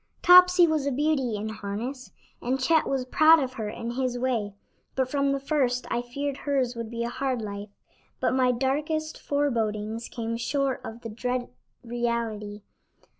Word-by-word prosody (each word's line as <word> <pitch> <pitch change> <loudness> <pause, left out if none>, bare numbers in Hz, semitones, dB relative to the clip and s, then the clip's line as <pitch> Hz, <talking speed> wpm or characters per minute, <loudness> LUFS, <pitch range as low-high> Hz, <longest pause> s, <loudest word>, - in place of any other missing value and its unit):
Topsy 360 0 +8
was 310 -4 0
a - - +1
beauty 270 -4 +1
in 210 +1 -4
harness, 220 +5 -5 0.3
and 255 +2 -1
Chet 315 +5 +3
was 265 -2 -1
proud 315 +5 +6
of 260 -3 -2
her 220 -4 -4
in 230 +2 -5
his 250 0 -1
way, 235 -5 -1 0.4
but 260 -1 +1
from 280 -1 +1
the 275 - 0
first 265 -3 0
I 240 - +1
feared 280 +3 -4
hers 265 -4 0
would 230 -1 -5
be 235 0 -3
a 235 - -2
hard 260 0 -2
life, 205 -1 -6 0.5
but - - +1
my 255 -1 +3
darkest 295 +5 -1
forebodings 225 -6 -1
came 230 -1 -3
short 275 +2 -1
of 225 +1 -8
the 230 - -6
dread 245 +3 -3 0.3
reality. 230 -3 -3
250 Hz, 170 wpm, -26 LUFS, 230-280 Hz, 0.5 s, Topsy